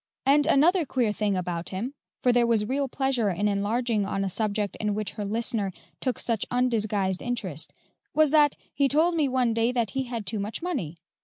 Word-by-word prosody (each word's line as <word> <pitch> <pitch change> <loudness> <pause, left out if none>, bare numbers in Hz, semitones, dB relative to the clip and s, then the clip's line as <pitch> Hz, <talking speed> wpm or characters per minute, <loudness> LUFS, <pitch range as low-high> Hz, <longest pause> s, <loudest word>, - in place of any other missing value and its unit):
And 290 +2 +4
another 335 +4 +4
queer 245 -7 0
thing 205 -2 0
about 175 -1 -3
him" 220 +8 -4 0.3
for 250 - +4
there 240 -1 +3
was 220 -3 +2
real 275 +4 -1
pleasure 265 -4 0
in 195 +3 0
enlarging 210 +2 0
on 195 0 -2
a 190 - -2
subject 210 0 -1
in 210 -1 -1
which 210 -2 -2
her 210 - -5
listener 210 -1 0 0.3
took 255 -2 -1
such 230 -4 -1
undisguised 215 -6 +1
interest 190 -11 -4 0.4
"was 310 -2 +3
that 295 -2 +5 0.2
he 280 - +3
told 315 +5 +3
me 305 -4 +1
one 250 -3 +1
day 230 +2 +2
that 235 -5 -1
he 265 -1 -2
had 235 -4 -5
too 215 +2 -3
much 210 +10 -4
money. 210 - -3
230 Hz, 200 wpm, -26 LUFS, 205-265 Hz, 0.4 s, that